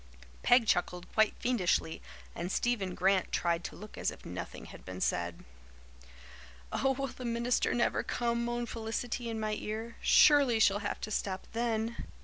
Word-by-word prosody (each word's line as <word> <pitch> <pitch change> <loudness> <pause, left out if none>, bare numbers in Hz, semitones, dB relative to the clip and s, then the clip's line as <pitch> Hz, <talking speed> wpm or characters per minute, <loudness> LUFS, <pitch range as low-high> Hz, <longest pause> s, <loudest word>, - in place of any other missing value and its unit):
Peg 245 -1 +5
chuckled 180 -2 0
quite 220 -1 +3
fiendishly 185 -9 0 0.3
and 175 +2 -4
Stephen 200 -7 0
Grant 190 0 +2
tried 170 -1 0
to - - -6
look 210 +2 -10
as - - +1
if - - -10
nothing - - -6
had - - -12
been 95 0 -7
said. 85 -2 -1 1.3
"Oh, 270 - +2
will 275 +1 -2
the 260 - -8
minister 235 +1 +1
never 240 - +2
come?" 235 0 -1
moaned 240 0 -2
Felicity 230 +1 -3
in 225 -1 -3
my 215 0 -1
ear. 220 +2 -5
"Surely 280 -6 +6
she'll 200 -1 +4
have - - -3
to 215 - -4
stop 190 -2 -2
then." 230 0 -1
225 Hz, 160 wpm, -31 LUFS, 190-240 Hz, 1.3 s, Surely